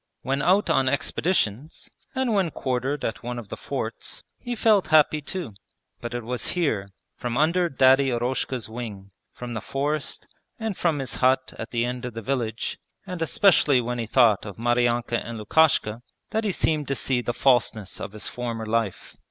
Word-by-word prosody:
When 135 +1 0
out 190 +6 +3
on 130 -1 +3
expeditions, 140 - -1 0.2
and 260 -3 +1
when 195 -4 +2
quartered 130 0 -2
at 115 - -3
one 120 0 -4
of 115 -4 -8
the - - -4
forts, - - -4 0.2
he 245 0 -4
felt 215 -3 +3
happy 155 -1 +4
too; 160 - -5 0.5
but 120 0 -5
it 120 - -3
was 125 +2 -2
here, 105 - 0 0.3
from 120 -1 -3
under 170 +4 +3
Daddy 135 0 +5
Eroshka's 125 0 -1
wing, 110 -4 -7 0.2
from 125 -1 -7
the 110 - -3
forest 145 +2 -2 0.3
and 220 -3 -3
from 165 -4 +1
his 135 -3 -3
hut 130 +1 +2
at 110 - -5
the 120 0 0
end 125 0 -4
of 125 -2 -6
the 115 - -5
village, 115 -3 -2 0.3
and 180 -3 -6
especially 160 -4 +4
when 120 0 -2
he 115 - -3
thought 115 -3 +4
of 100 -3 -8
Maryanka 120 0 +1
and 115 0 -6
Lukashka, 115 -2 +3 0.3
that 220 0 0
he 205 - +2
seemed 155 -5 0
to 135 - 0
see 130 -2 0
the 120 - -2
falseness 120 -5 +1
of 100 - -6
his 105 - -4
former 115 -2 -4
life. 110 -3 -2
125 Hz, 180 wpm, -25 LUFS, 115-155 Hz, 0.5 s, Daddy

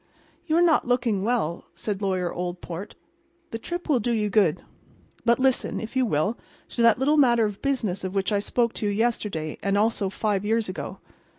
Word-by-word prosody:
"You 320 0 +2
are 345 - +5
not 325 -7 +3
looking 240 -5 +1
well," 215 -8 -1
said 200 +3 -3
Lawyer 185 -3 -1
Oldport. 180 +2 -5 0.6
"The 225 - -4
trip 345 +8 -5
will 285 -6 +3
do 235 +2 -1
you 210 -3 0
good. 195 -8 +2 0.6
But 235 0 +4
listen, 265 -1 +1
if 225 +3 -7
you 260 -2 +2
will, 200 +6 0 0.3
to - - -3
that 230 -1 +6
little 285 +4 +2
matter 240 -5 +5
of 205 -2 -5
business 230 -10 -1
of 185 +1 -4
which 195 +1 0
I 205 - +2
spoke 235 +3 0
to 210 - -2
you - - +1
yesterday, 205 -8 -1
and 200 0 +1
also 210 -2 +1
five 205 0 -1
years 225 +1 +1
ago. 185 - -6
215 Hz, 195 wpm, -25 LUFS, 195-240 Hz, 0.6 s, that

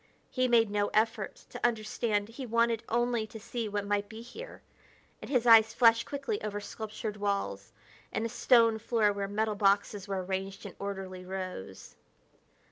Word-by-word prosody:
He 255 -1 +1
made 230 -3 +4
no 205 0 +1
effort 220 -2 +1 0.2
to - - -8
understand; 215 -2 0
he 255 +3 -7
wanted 230 0 +2
only 235 -1 +1
to 220 0 -10
see 235 0 -4
what 205 0 -2
might 205 0 -1
be 225 +1 -9
here; 455 - -10 0.6
and - - -8
his 250 -4 +2
eyes 225 -1 +7
flashed 230 -1 +5
quickly 290 +10 -3
over 205 -1 -3
sculptured 215 0 -6
walls 115 - -2 0.4
and 220 - -1
a - - -2
stone 230 -1 +4
floor 215 -2 +2
where 200 0 -3
metal 215 +2 0
boxes 200 0 +1
were 190 -2 -2
arranged 190 +1 -4
in - - -8
orderly 190 -2 -5
rows. 185 - -7
215 Hz, 165 wpm, -30 LUFS, 200-230 Hz, 0.6 s, eyes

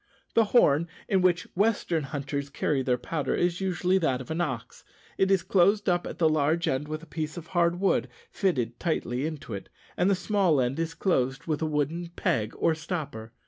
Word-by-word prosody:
The 230 - +5
horn 170 - +4 0.2
in 190 -2 +2
which 180 -2 +3
western 190 -6 +1
hunters 140 0 -4
carry 140 0 0
their 125 -1 +1
powder 150 +3 -2
is 175 +1 0
usually 185 0 +1
that 135 -7 +1
of 130 +3 -8
an 165 +2 -1
ox. 130 -9 -4 0.4
It 190 - +3
is 190 -3 +3
closed 195 +3 +3
up 175 -1 +1
at - - -7
the 165 - +4
large 155 +2 +1
end 135 +3 0
with 155 +1 -5
a - - -9
piece 155 0 -5
of 170 - -6
hard 170 0 +1
wood 195 - +2 0.2
fitted 125 - -1
tightly 140 -5 -1
into 155 -2 -6
it, 100 - -7 0.3
and 180 - +2
the 200 - +4
small 185 -5 +2
end 130 +4 0
is 165 0 -2
closed 135 -8 0
with 155 -2 -1
a 160 - +1
wooden 155 +3 -1
peg 115 - 0
or 165 - +2
stopper. 155 -9 -5
160 Hz, 200 wpm, -27 LUFS, 140-180 Hz, 0.4 s, The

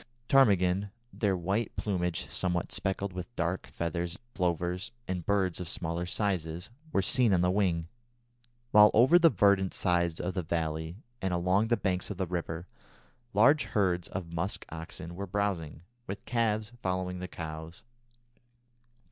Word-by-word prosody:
Ptarmigan, 100 -7 +4 0.2
their 100 -4 +1
white 100 +6 -1
plumage 90 -5 -1
somewhat 90 -2 -1
speckled 95 0 -1
with 90 +6 -7
dark 85 +2 -1
feathers, 85 0 -3 0.2
plovers, 90 0 -1 0.2
and 90 -3 -3
birds 95 -3 +1
of 90 -2 -5
smaller 85 +1 -2
size, 90 -2 -2 0.2
were 100 - +2
seen 120 +2 +3
on 85 - +2
the 90 0 +3
wing; 90 -4 +1 0.8
while 105 0 +8
over 130 +10 +7
the 165 -1 +7
verdant 100 - +3
sides 85 -3 +1
of 90 +1 -2
the 95 - -1
valley 80 0 -2 0.2
and 95 -2 0
along 90 +5 +2
the 120 0 +2
banks 90 -2 -1
of 100 - -5
the 95 - 0
river, 85 -1 -4 0.7
large 140 +8 +5
herds 90 -4 +1
of 85 -2 -6
musk 85 +4 -2
oxen 80 +1 -7
were 100 +3 -5
browsing, 90 -6 -2 0.2
with 100 +2 -6
calves 110 -2 0
following 90 -1 -2
the 90 - -5
cows. 80 0 -7
90 Hz, 150 wpm, -30 LUFS, 85-100 Hz, 0.8 s, while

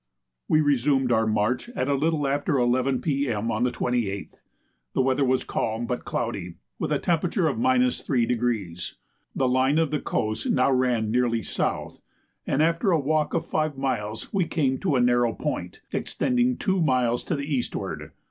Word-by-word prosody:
We 155 - +4
resumed 135 -2 +2
our 110 -1 +3
march 110 - 0
at 130 - -1
a 140 - +2
little 150 +1 +1
after 145 +2 0
11 125 +1 +1
P.M. 125 -7 -1
on 110 +3 0
the - - +2
28th. 120 -5 -2 0.5
The - - +2
weather 135 +2 +2
was 130 -1 +2
calm, 115 +1 -2
but 125 +1 -3
cloudy, 95 -8 -3 0.2
with - - -1
the - - +2
temperature 175 +3 0
3°. 125 - 0 0.4
The 130 - +1
line 130 +3 +2
of 155 -2 0
coast 110 0 -1
now 130 +2 +3
ran 125 -4 +1
nearly 120 -2 +1
south, - - -2 0.5
and 140 +3 +2
after 165 +4 +2
a 170 -4 +3
walk 150 +2 0
of 165 - 0
five 155 -2 -1
miles 110 - -3
we 190 -4 +2
came 135 -5 0
to 170 -8 0
a 125 - +3
narrow 120 -1 +3
point, - - -4
extending 250 -1 0
two 190 -2 0
miles 125 -5 +2
to 170 - -1
the 140 -1 -3
eastward. 140 -5 -3
130 Hz, 165 wpm, -25 LUFS, 120-155 Hz, 0.5 s, We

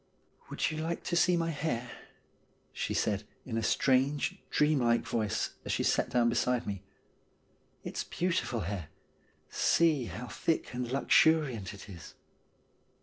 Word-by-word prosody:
'Would - - -1
you 155 - -4
like 165 +2 -3
to 175 - -2
see 175 0 +4
my 165 0 0
hair? 125 -6 -3 0.4
' - - -38 0.3
she - - -3
said, 105 -1 0 0.2
in 120 - -4
a 115 - 0
strange, 135 +5 +2
dreamlike 130 -6 +3
voice 110 -4 -1
as - - -3
she - - 0
sat - - +2
down 120 -1 +3
beside 120 +1 +1
me. 100 -2 -4 0.5
' - - -39
It's - - -4
beautiful 170 -9 -1
hair; 90 -3 -4 0.6
see 155 -7 +3
how 115 +2 -6
thick 160 +4 -2
and 125 -1 -3
luxuriant 135 - +3
it 100 - -12
is.' 90 -5 -11
125 Hz, 145 wpm, -31 LUFS, 115-155 Hz, 0.6 s, see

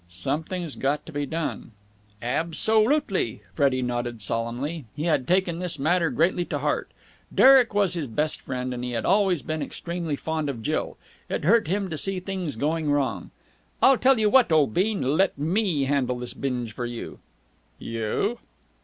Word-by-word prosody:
"Something's 150 - -3
got 145 +2 -1
to - - -10
be 145 -1 -3
done." 160 -6 -4 0.5
"Absolutely!" 185 - +2
Freddie 130 +2 +1
nodded 120 -1 -3
solemnly. 120 - -3
He 150 - -4
had 150 -6 +1
taken 180 -2 +1
this 175 -3 -2
matter 165 +4 +2
greatly 175 +2 +1
to - - -3
heart. - - -1 0.5
Derek 260 -5 +6
was 200 -3 +3
his 165 -5 -2
best 150 +7 -1
friend, 125 -1 -4
and 125 0 -5
he 125 0 -3
had 115 - -2
always 190 - +2
been 155 +2 -3
extremely 170 -2 -4
fond 155 0 -3
of 120 -5 -5
Jill. - - -2 0.3
It - - -2
hurt 225 +1 +4
him 195 +3 -1
to 155 - -3
see 195 +3 0
things 185 -5 -4
going 155 +5 -1
wrong. 130 - -1 0.5
"I'll 265 -2 +5
tell 265 0 +4
you 215 -1 +2
what, 245 -3 +4
old 150 -8 +3
bean. 200 - +1
Let 155 +8 +2
me 165 0 0
handle 130 -2 0
this 125 0 -5
binge 125 -4 -3
for 120 +1 -4
you." 120 -1 -7 0.6
"You?" 115 - -2
155 Hz, 170 wpm, -25 LUFS, 125-185 Hz, 0.6 s, Derek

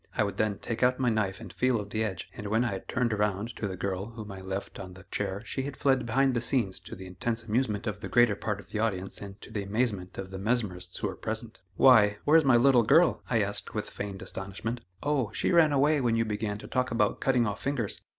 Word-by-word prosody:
I - - +4
would 100 -1 -3
then 105 -2 0
take 115 - -4
out 125 0 +4
my 125 -2 +2
knife 100 -4 0
and 105 -7 -10
feel 125 +1 +1
of 100 -1 -7
the 110 0 0
edge, 95 -6 -4
and 105 - -6
when 110 +4 +2
I 100 -5 -2
turned 120 -2 0
around 105 +2 -1
to 105 - -2
the 95 -1 -5
girl 95 +1 -3
whom 110 -3 -8
I 95 -1 -8
left 95 +1 -5
on 90 -1 -8
the 95 - -13
chair 100 0 -2
she 135 - -3
had 140 0 -5
fled 130 -3 +2
behind 135 +3 +2
the 120 - 0
scenes 115 -6 +1
to - - -9
the 95 - -9
intense 115 +6 -3
amusement 110 -1 -1
of 105 -3 -3
the - - -6
greater 120 -3 +4
part 105 0 -3
of - - -14
the 105 - -2
audience 95 -4 -1
and 100 0 -9
to - - -11
the 105 -2 -2
amazement 100 -2 -2
of 95 -1 -6
the 95 - -6
mesmerists 95 -5 -1
who - - -1
were 95 - -5
present. 110 -1 -5
"Why! 105 -4 +6
where's 160 +2 +6
my 130 -4 +5
little 125 0 +5
girl?" 160 +10 +4
I 115 -4 +3
asked 100 0 -2
with - - -3
feigned 100 -1 -6
astonishment. 100 +5 -4 0.2
"Oh! 140 -7 0
she - - 0
ran 165 -3 +5
away 145 +1 +3
when 120 -2 +2
you 115 0 +2
began 105 -1 -2
to - - -10
talk 125 0 0
about 110 -3 +1
cutting 125 -3 +3
off 105 -2 -3
fingers." 130 -7 -2
110 Hz, 250 wpm, -28 LUFS, 100-125 Hz, 0.2 s, Why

